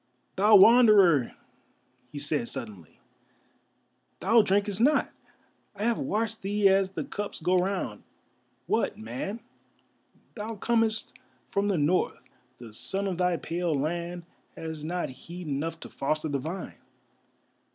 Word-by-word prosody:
"Thou 210 +2 +5
Wanderer!" 200 - +6 0.8
he 150 - -8
said, 145 -3 -1
suddenly. 105 - -8 1.2
"Thou 230 0 +5
drinkest 205 0 0
not: 290 +5 +3 0.6
I 205 - -5
have 235 0 +1
watched 225 +1 -2
thee 205 +1 +2
as 195 0 +2
the - - -3
cups 205 0 -5
go 180 +2 +2
round; 185 - -2 0.6
what, - - 0
man, 125 - -5 0.9
thou 220 0 -5
comest 225 +1 0 0.4
from 200 +1 0
the 200 -3 +1
North, 160 +5 +1 0.4
the 115 -3 -12
sun 195 - -3
of 185 -3 -3
thy 180 -1 +2
pale 170 +1 -2
land 170 +3 -3 0.3
has 160 -2 -6
not 175 +3 -2
heat 170 +6 -10
enough 150 +3 -3
to - - -8
foster 155 +3 -2
the 140 -1 -1
vine. 165 +8 -6
180 Hz, 130 wpm, -27 LUFS, 155-205 Hz, 1.2 s, Wanderer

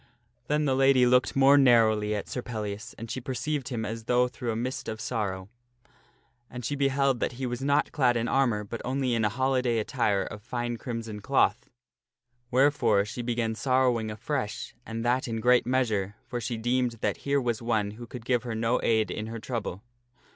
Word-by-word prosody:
Then 150 +1 +1
the 135 - +2
lady 135 -1 +5
looked 125 +1 +3
more 135 +1 +6
narrowly 110 -5 +4
at 105 - -4
Sir 125 - -4
Pellias, 110 -1 -5
and 115 0 -7
she 130 - -4
perceived 135 +2 -3
him 115 -4 -3
as 110 +1 -5
though 125 +1 +3
through 125 -1 -6
a - - -3
mist 125 +3 -3
of 110 0 -5
sorrow. 100 -5 -3 1.0
And 125 -1 -7
she 145 - -1
beheld 135 -2 +1
that - - -1
he 130 +2 -4
was 120 0 -3
not 140 +2 +2
clad 125 -5 +2
in 115 +1 -1
armor, 120 -5 +1
but 110 +3 -6
only 130 0 0
in 115 -1 +1
a 105 - +3
holiday 130 0 +1
attire 105 -4 +1
of 105 - -8
fine 120 0 -3
crimson 115 -3 -5
cloth. 135 +6 +1 0.8
Where 135 +4 +4
fore 110 -8 +2
she 115 +3 -5
began 120 -1 -1
sorrowing 125 -2 +1
afresh, 110 +1 -4
and 115 +1 -4
that 125 +2 +1
in 115 -1 -2
great 125 +1 +4
measure, 110 -6 0
for 120 0 -4
she 120 +1 -3
deemed 120 +1 0
that - - 0
here 140 0 0
was 120 -3 -1
one 110 -3 0
who 115 +3 -10
could 120 -1 -9
give 125 -2 +2
her 115 -1 -4
no 115 +2 +1
aid 110 -1 +2
in 110 0 -4
her 115 +1 -5
trouble. 110 -4 -4
120 Hz, 200 wpm, -27 LUFS, 110-130 Hz, 1.0 s, more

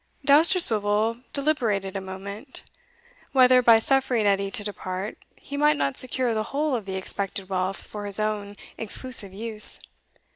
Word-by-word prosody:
Dousterswivel 230 - +3
deliberated 230 -10 -1
a 195 - -3
moment, 200 +7 -8 0.7
whether, 255 -1 +6
by 230 -2 +6
suffering 250 -2 +1
Edie 200 -1 +1
to 205 - -3
depart, 195 -1 -5 0.2
he 285 - -8
might 300 +1 +3
not 140 -1 -1
secure 255 -1 0
the 215 - -1
whole 290 +2 -1
of 220 -5 -4
the 190 - -4
expected 195 0 -2
wealth 185 0 -2
for 205 -1 -8
his 200 +1 -4
own 210 -1 -3 0.2
exclusive 225 -2 -1
use. 215 +2 +4
215 Hz, 145 wpm, -25 LUFS, 195-255 Hz, 0.7 s, whether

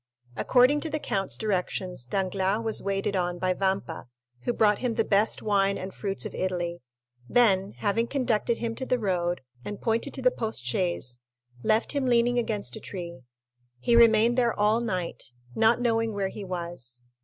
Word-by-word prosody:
According 255 - +4
to 320 - -3
the 305 - -1
count's 195 -9 -2
directions, 185 - -2
Danglars 195 - 0
was 220 - +1
waited 195 0 -1
on 175 -1 -1
by 185 +1 +1
Vampa, 190 -6 -2 0.4
who - - +2
brought 210 -3 +3
him 245 -3 -1
the - - +2
best 205 +2 +2
wine 200 -2 +2
and 190 0 -6
fruits 195 -2 -2
of - - -5
Italy; 175 -2 -2 0.5
then, 200 -5 +3
having 225 +3 0
conducted 235 -4 0
him 230 -1 -2
to 260 - -3
the 255 - +2
road, 180 -5 -1 0.2
and 205 +7 -6
pointed 230 +4 -1
to 265 - -4
the 255 - +5
post 220 - -3
chaise, 125 -4 -1 0.4
left 215 - +2
him 280 -3 0
leaning 240 0 +3
against 210 - -2
a - - -7
tree. 170 -7 -7 0.6
He 235 - +2
remained 230 +1 +5
there 235 -3 +1
all 210 +2 +3
night, 180 - -3 0.2
not 225 - +3
knowing 225 -2 +1
where 195 -1 -1
he 205 - -7
was. 170 -10 -6
205 Hz, 175 wpm, -27 LUFS, 185-230 Hz, 0.6 s, the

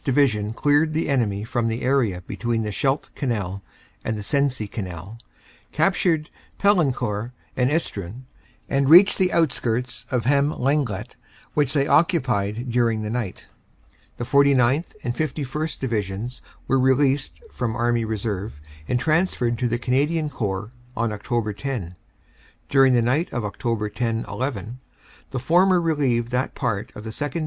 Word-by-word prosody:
Division 125 -7 +2
cleared 150 +4 +2
the 160 - 0
enemy 105 -7 +1
from 115 +1 -1
the 115 +1 -2
area 125 -9 +1
between 115 -1 -2
the 105 - -3
Scheldt 135 +7 -1
Canal 100 -8 -2 0.4
and 110 - -2
the 105 - -5
Sensee 140 -2 0
Canal, 95 +1 -7 0.5
captured 170 -5 +1 0.3
Paillencourt 125 - +1 0.2
and 125 0 +2
Estrun, 120 - -3 0.4
and 135 0 +1
reached 185 +6 +8
the 185 -1 +3
outskirts 125 -7 0
of 125 -4 -1
Hem 140 +3 +3
Lenglet, 125 -5 -1 0.4
which 145 -3 +1
they 140 -2 +2
occupied 125 - +1
during 115 -2 +1
the 105 - -3
night. 115 -6 -4 0.7
"The - - -3
49th. 140 - +3
and 120 0 -2
51st. 150 +1 -3
Divisions 110 0 -3 0.3
were 135 - +3
released 135 +1 +2
from 115 -2 -2
Army 120 -1 +1
Reserve 105 -5 -3 0.3
and 125 - +1
transferred 155 -6 +1
to 125 - +1
the 120 +1 0
Canadian 145 +5 0
Corps 105 -2 -3 0.3
on 115 -1 0
Oct. 105 0 -2
10. 110 -11 -4 0.7
During 135 -2 +5
the 120 - +3
night 140 +9 +1
of 120 - -2
Oct. 105 0 -2
10 115 0 -1
11 125 -2 -4 0.5
the 135 - -4
former 175 +8 +4
relieved 135 -8 +1
that 125 +2 -1
part 115 -7 -2
of 105 - -8
the 110 - -5
2nd. 145 +7 -3
125 Hz, 145 wpm, -23 LUFS, 110-140 Hz, 0.7 s, reached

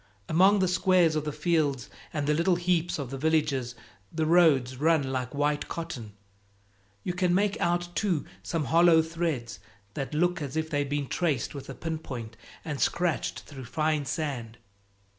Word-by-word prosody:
Among 190 +5 +5
the 190 -1 +2
squares 180 -2 +3
of 155 -1 -1
the 150 - -2
fields 145 -6 0 0.2
and 150 -2 -2
the 150 - +2
little 170 +4 +2
heaps 175 -1 0
of 135 -4 -5
the 135 - -5
villages 145 -5 +1 0.4
the 160 0 -1
roads 155 -7 +4
run 150 -2 +2
like 130 +1 -3
white 145 +1 0
cotton. 125 -11 -6 0.9
You 180 - -2
can 180 -1 +1
make 205 +2 +1
out, 175 0 0
too, 185 -8 0 0.2
some 165 -4 -2
hollow 165 +1 +5
threads 160 -10 -3 0.3
that 140 +1 -4
look 175 +1 +1
as 145 +1 -4
if 160 0 -2
they'd 145 -1 0
been 145 0 -1
traced 145 -4 -1
with 140 -2 -8
a 135 - -6
pin 160 -1 -4
point 120 -7 -7 0.3
and 150 -4 -4
scratched 175 -2 0
through 135 -4 -10
fine 155 +2 0
sand. 130 -7 -4
155 Hz, 170 wpm, -28 LUFS, 140-170 Hz, 0.9 s, Among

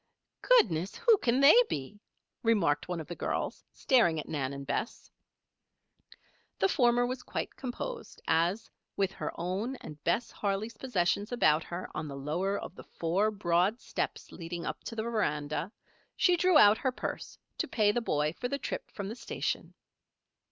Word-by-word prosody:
"Goodness! 190 - +3
who 465 -3 +4
can 250 +1 +2
they 280 +2 +9 0.2
be?" 145 +9 -5 0.4
remarked 185 -11 +2
one 180 -1 -3
of 160 - -6
the 175 - -6
girls, - - -3
staring 225 -12 +3
at - - -6
Nan 140 -4 -2
and 140 0 -7
Bess. 220 - -4 1.5
The - - +3
former 245 -8 +3
was 250 +1 -3
quite - - -4
composed 445 - -6
as, 170 +6 +1 0.3
with 195 -1 +1
her - - -4
own 190 +9 -2
and 150 - -11
Bess 200 +8 0
Harley's 205 +3 -2
possessions 205 -3 0
about 160 -10 +3
her 175 +1 -5
on 155 - -4
the 140 -1 -6
lower 175 +8 -1
of - - -7
the - - -11
four 180 +6 0
broad 195 +2 +1
steps - - -4
leading 170 0 -6
up - - -5
to 230 - -6
the 220 - -2
veranda, 165 -7 -1 0.4
she 360 - +4
drew 360 -1 +4
out 210 -5 +7
her 260 - 0
purse 250 - -5 0.2
to - - 0
pay 210 -2 +3
the 240 - -1
boy 150 -7 0
for 245 - -4
the 280 - -2
trip - - -5
from 200 -2 -6
the 220 - -5
station. 240 - -4
200 Hz, 170 wpm, -30 LUFS, 165-245 Hz, 1.5 s, they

